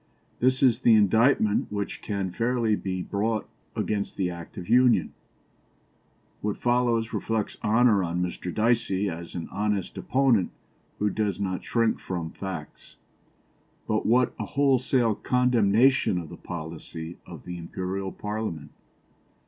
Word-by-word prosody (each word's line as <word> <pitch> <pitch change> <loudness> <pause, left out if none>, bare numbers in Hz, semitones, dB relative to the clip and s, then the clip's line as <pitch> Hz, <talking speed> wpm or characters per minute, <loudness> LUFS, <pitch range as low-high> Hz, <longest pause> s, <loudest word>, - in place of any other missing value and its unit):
This 130 +2 +2
is 125 -3 +5
the 120 -3 +5
indictment 110 +1 +3
which 100 -1 -4
can 100 -3 -3
fairly 115 +1 +1
be 95 -3 -3
brought 110 +2 -1 0.3
against 105 -2 -2
the 90 -2 0
Act 85 -1 -10
of 90 -2 -6
Union." 120 -7 +4 1.3
What 105 -1 -2
follows 120 -2 +1
reflects 110 -2 -2
honour 110 -2 +4
on 85 0 -2
Mr. 90 0 -4
Dicey 110 -3 +1
as 85 +1 -8
an 85 - -4
honest 105 -3 -2
opponent 130 -8 +2 0.5
who 105 0 +1
does 105 -1 -1
not 95 -2 -2
shrink 115 -2 +1
from 85 -3 -4
facts; 95 -6 -8 0.9
but 110 0 +1
what 125 +3 +3
a 105 - -2
wholesale 130 -2 +2
condemnation 125 -1 +3
of 85 -3 -5
the - - -8
policy 80 0 -7
of - - -10
the 90 0 -6
Imperial 95 +3 -4
Parliament! 105 -8 -5
105 Hz, 130 wpm, -26 LUFS, 90-115 Hz, 1.3 s, is